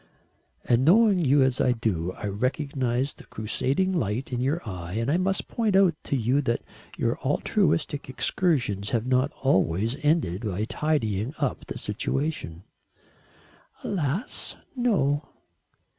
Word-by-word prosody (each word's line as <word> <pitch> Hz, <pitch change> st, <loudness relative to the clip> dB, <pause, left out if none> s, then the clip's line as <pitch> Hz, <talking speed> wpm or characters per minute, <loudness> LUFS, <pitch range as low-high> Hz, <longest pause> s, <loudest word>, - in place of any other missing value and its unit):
"And 120 Hz, +1 st, +3 dB
knowing 200 Hz, +4 st, +5 dB
you 145 Hz, -3 st, +4 dB
as 130 Hz, -1 st, +1 dB
I 125 Hz, -, +3 dB
do, 90 Hz, -7 st, -1 dB
I -, -, -7 dB
recognise 130 Hz, +4 st, -1 dB
the -, -, -15 dB
crusading 135 Hz, -, -1 dB
light 125 Hz, -, -2 dB
in 125 Hz, -, -1 dB
your 140 Hz, +2 st, -1 dB
eye 90 Hz, -3 st, -6 dB
and 115 Hz, +5 st, 0 dB
I 165 Hz, -, +3 dB
must 190 Hz, +1 st, 0 dB
point 220 Hz, -4 st, 0 dB
out 190 Hz, -3 st, +5 dB
to -, -, -1 dB
you 130 Hz, +3 st, +2 dB
that 120 Hz, -4 st, -1 dB, 0.3 s
your 115 Hz, 0 st, 0 dB
altruistic 150 Hz, -1 st, 0 dB
excursions 120 Hz, -, 0 dB
have 115 Hz, -1 st, 0 dB
not 130 Hz, +2 st, +2 dB
always 110 Hz, -2 st, +2 dB
ended 145 Hz, -, +1 dB
by 105 Hz, -1 st, -2 dB
tidying 120 Hz, -4 st, -1 dB
up 140 Hz, -5 st, -2 dB
the -, -, -5 dB
situation." 135 Hz, -, -3 dB, 1.2 s
"Alas, 175 Hz, -, -2 dB, 0.2 s
no." 155 Hz, -, +1 dB
130 Hz, 135 wpm, -26 LUFS, 110-155 Hz, 1.2 s, knowing